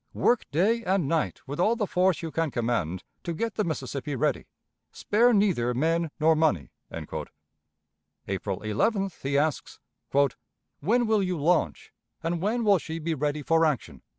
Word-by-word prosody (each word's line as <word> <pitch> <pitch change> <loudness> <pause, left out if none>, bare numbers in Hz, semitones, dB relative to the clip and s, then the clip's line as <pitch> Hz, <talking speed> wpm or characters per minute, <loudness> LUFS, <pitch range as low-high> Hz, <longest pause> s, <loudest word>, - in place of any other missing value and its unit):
Work 245 - +2
day 210 - +2
and 190 -7 +1
night 160 +1 -1
with 145 +3 -5
all 215 +6 +3
the 220 -3 0
force 185 -2 +1
you 165 - -4
can 165 0 0
command 115 - -1 0.2
to 170 -2 -4
get 230 +5 -2
the 210 - 0
Mississippi 140 -3 -3
ready. 145 +1 0 0.4
Spare 235 +4 +3
neither 180 - +2
men 165 +4 +1
nor 160 +1 +4
money." 155 - +1 0.2
April - - -5 1.3
11th 190 - 0
he 140 +1 0
asks, 150 0 -1 1.0
"When 235 - +2
will 220 -2 +2
you 180 -3 -1
launch, 145 - 0 0.3
and 165 0 -1
when 225 +5 0
will 200 -4 +5
she 160 0 -6
be 165 0 -2
ready 150 0 -1
for 165 +3 +3
action?" 150 -6 -1
165 Hz, 155 wpm, -27 LUFS, 145-195 Hz, 1.3 s, will